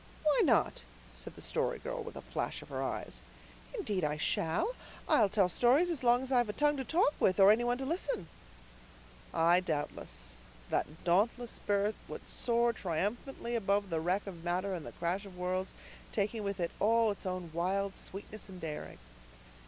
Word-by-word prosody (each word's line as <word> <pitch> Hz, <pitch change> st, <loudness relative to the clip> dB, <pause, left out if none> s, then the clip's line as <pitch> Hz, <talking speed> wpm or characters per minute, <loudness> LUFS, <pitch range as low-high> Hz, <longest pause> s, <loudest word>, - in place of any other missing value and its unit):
"Why 300 Hz, -2 st, +4 dB
not?" -, -, +3 dB, 0.3 s
said -, -, -10 dB
the -, -, -10 dB
Story -, -, -1 dB
Girl, -, -, -4 dB
with 465 Hz, +1 st, -8 dB
a -, -, -7 dB
flash -, -, -3 dB
of -, -, -15 dB
her -, -, -3 dB
eyes. -, -, -4 dB, 0.5 s
"Indeed 210 Hz, -, -1 dB
I 150 Hz, 0 st, 0 dB
shall. 165 Hz, -, +1 dB, 0.3 s
I'll 205 Hz, -, +5 dB
tell 200 Hz, -2 st, +3 dB
stories 255 Hz, -, +4 dB
as 310 Hz, -6 st, -2 dB
long 245 Hz, +1 st, +4 dB
as 265 Hz, -, -4 dB
I've 245 Hz, -4 st, +3 dB
a -, -, -2 dB
tongue 295 Hz, +3 st, +3 dB
to 265 Hz, -, -2 dB
talk 320 Hz, +2 st, +3 dB
with, 185 Hz, +1 st, +3 dB
or 195 Hz, +1 st, +9 dB
any 225 Hz, +3 st, +3 dB
one 240 Hz, 0 st, +1 dB
to 265 Hz, -, -3 dB
listen." 285 Hz, -, -2 dB, 1.0 s
Ay, 170 Hz, +2 st, +5 dB
doubtless. 145 Hz, -, -4 dB, 0.3 s
That 155 Hz, -, -1 dB
dauntless 225 Hz, +7 st, +2 dB
spirit 205 Hz, +1 st, 0 dB
would -, -, -8 dB
soar 235 Hz, -1 st, +1 dB
triumphantly 215 Hz, -, -2 dB
above 200 Hz, -3 st, +1 dB
the 165 Hz, -, +1 dB
wreck 180 Hz, +5 st, 0 dB
of 175 Hz, -4 st, -8 dB
matter 180 Hz, +3 st, 0 dB
and 170 Hz, -5 st, -5 dB
the -, -, -6 dB
crash 180 Hz, +4 st, -2 dB
of 185 Hz, -2 st, -12 dB
worlds, 185 Hz, +1 st, -2 dB, 0.4 s
taking 215 Hz, +2 st, -1 dB
with 200 Hz, -1 st, -3 dB
it 170 Hz, -1 st, 0 dB
all 225 Hz, +1 st, +4 dB
its 200 Hz, -, -6 dB
own 180 Hz, -2 st, -4 dB
wild 190 Hz, +3 st, 0 dB
sweetness 205 Hz, +2 st, -7 dB
and 185 Hz, -1 st, -9 dB
daring. 155 Hz, -3 st, -5 dB
200 Hz, 185 wpm, -33 LUFS, 180-240 Hz, 1.0 s, or